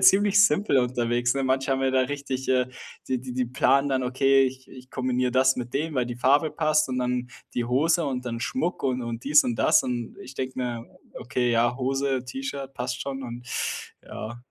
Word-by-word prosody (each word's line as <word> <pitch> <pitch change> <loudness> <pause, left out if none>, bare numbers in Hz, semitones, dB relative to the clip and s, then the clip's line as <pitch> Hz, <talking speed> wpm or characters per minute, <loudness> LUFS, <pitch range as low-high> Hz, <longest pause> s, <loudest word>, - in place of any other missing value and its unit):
ziemlich 205 +1 +6
simpel 185 -5 +3
unterwegs, 120 0 +1
ne? 135 - -1
Manche 135 +1 0
haben 135 0 +1
ja 135 - +2
da 130 - +4
richtig 135 0 -3
äh, 130 -1 +3 0.4
die 130 -2 0
die 130 -1 -7
die 125 0 0
planen 140 +3 +2
dann: 130 -1 0
„Okay, 135 +2 +3
ich 130 0 -5
ich 130 0 -13
kombiniere 125 -1 0
das 130 +1 +4
mit 120 -1 -5
dem, 155 +2 -1
weil 125 -2 +1
die 120 0 -5
Farbe 145 +5 +3
passt 155 -2 +2
und 130 0 -2
dann 125 0 -1 0.3
die 120 - 0
Hose 155 +8 +2
und 125 -2 -3
dann 115 -1 -4
Schmuck“ 180 - -2
und 130 -2 0
und 115 0 -5
dies 150 +2 +5
und 120 - -1
das. - - +4
Und 120 -2 -4
ich 130 +2 -10
denke 130 0 -4
mir: 120 -2 -3 0.3
„Okay, 125 -1 -1
ja, 120 +1 +2
Hose, 135 0 -1
T-Shirt 135 +1 -6
passt 125 0 -3
schon“ 135 -1 -4
und 120 0 -8 0.6
ja. 120 +2 -8
130 Hz, 205 wpm, -25 LUFS, 125-135 Hz, 0.6 s, ziemlich